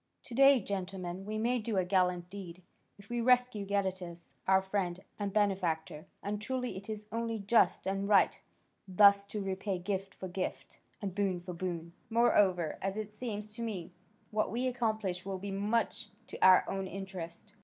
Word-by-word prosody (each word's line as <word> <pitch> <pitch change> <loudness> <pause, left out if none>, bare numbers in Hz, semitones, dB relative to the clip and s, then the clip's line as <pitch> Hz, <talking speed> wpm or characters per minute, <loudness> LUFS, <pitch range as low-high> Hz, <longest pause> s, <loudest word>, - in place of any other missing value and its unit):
To 245 - -10
day, 275 +1 +7
gentlemen, 190 -2 -4
we 215 0 -2
may 240 +3 +1
do 215 -2 -2
a 185 - +2
gallant 180 -2 +2
deed, 185 -3 -8 0.3
if 200 0 -15
we 240 +1 -1
rescue 245 -4 +3
Gadatas, 185 -4 -2
our 190 0 +6
friend 190 -2 -2 0.2
and 200 -1 -1
benefactor; 185 -7 0 0.2
and 205 +1 -3
truly 250 +2 -2
it 195 +3 -8
is 215 -1 -5
only 230 0 -1
just 210 +3 +3
and 195 +1 -1
right 200 -2 +4 0.5
thus 200 +1 +6
to 205 0 -4
repay 190 0 -2
gift 195 +1 -3
for 190 - -6
gift, 185 +1 -5 0.2
and 195 -2 -2
boon 195 -2 0
for 180 +1 -7
boon. 170 -1 -4 0.2
Moreover, 200 -8 +3
as 195 +1 -2
it 215 -1 -4
seems 210 -2 -5
to 235 - -6
me, 190 -7 -4 0.4
what 215 0 +1
we 245 +3 -1
accomplish 220 -7 -1
will 195 -1 -3
be 200 +1 -5
much 210 +4 0 0.2
to - - -9
our 185 -1 +7
own 195 -1 -2
interest. 190 0 -7
195 Hz, 175 wpm, -32 LUFS, 185-215 Hz, 0.5 s, day